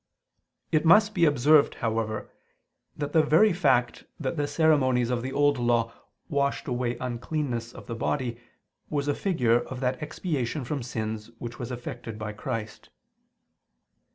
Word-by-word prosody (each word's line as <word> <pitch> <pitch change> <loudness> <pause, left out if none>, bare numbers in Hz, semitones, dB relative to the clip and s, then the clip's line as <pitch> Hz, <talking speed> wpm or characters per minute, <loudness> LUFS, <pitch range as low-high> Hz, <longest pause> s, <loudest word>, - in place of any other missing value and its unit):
It 155 -1 +3
must 210 +6 +6
be 170 -4 +4
observed, 145 +1 +4
however, 110 -2 -2 0.7
that 145 -1 -4
the 160 - +6
very 165 +7 +4
fact 130 -8 +1
that 135 0 -2
the 145 -2 -1
ceremonies 130 -7 +3
of 120 -1 0
the 130 +2 -4
Old 145 -1 +2
Law 120 -1 +1 0.3
washed 140 -3 -1
away 125 -1 -1
uncleanness 125 -1 -3
of - - -12
the 115 - -5
body, 120 0 -2 0.5
was 145 -1 -1
a 145 - +2
figure 125 - +2
of 125 +1 -7
that 125 0 -1
expiation 150 -3 -3
from 140 +2 -3
sins 110 -2 -4
which 120 +1 -7
was 125 0 -5
effected 120 -3 -6
by 105 0 -5
Christ. 110 -1 -5
130 Hz, 150 wpm, -27 LUFS, 120-150 Hz, 0.7 s, must